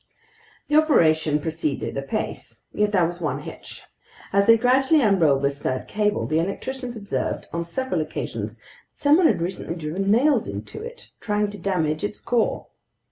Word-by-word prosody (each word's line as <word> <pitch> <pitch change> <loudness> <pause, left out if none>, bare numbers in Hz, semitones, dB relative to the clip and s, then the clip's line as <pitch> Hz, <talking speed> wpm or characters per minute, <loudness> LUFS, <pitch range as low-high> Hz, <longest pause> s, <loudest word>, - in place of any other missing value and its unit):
The 295 - +3
operation 160 - +3
proceeded 155 -2 -3
apace. 135 +11 -4
Yet 210 0 +1
there 185 -4 +3
was 175 +1 -5
one 150 - -2
hitch. - - -10 0.5
As 200 +1 +3
they 230 0 +8
gradually 265 +5 +3
unrolled 160 -10 +3
this 140 0 0
third 130 -2 -2
cable, 210 0 0
the 155 +1 +1
electricians 245 +7 -4
observed 205 -2 -3
on 170 0 -2
several 260 +2 -2
occasions 155 - -5
that - - -30 0.3
someone 310 +4 +4
had - - +1
recently 170 -1 -4
driven 175 +4 -3
nails 265 +8 +3
into 430 - -7
it, 475 +1 -9
trying 210 -1 -1
to 205 - -9
damage 160 -4 -1
its 205 0 -3
core. 235 -2 0
200 Hz, 160 wpm, -23 LUFS, 160-245 Hz, 0.5 s, they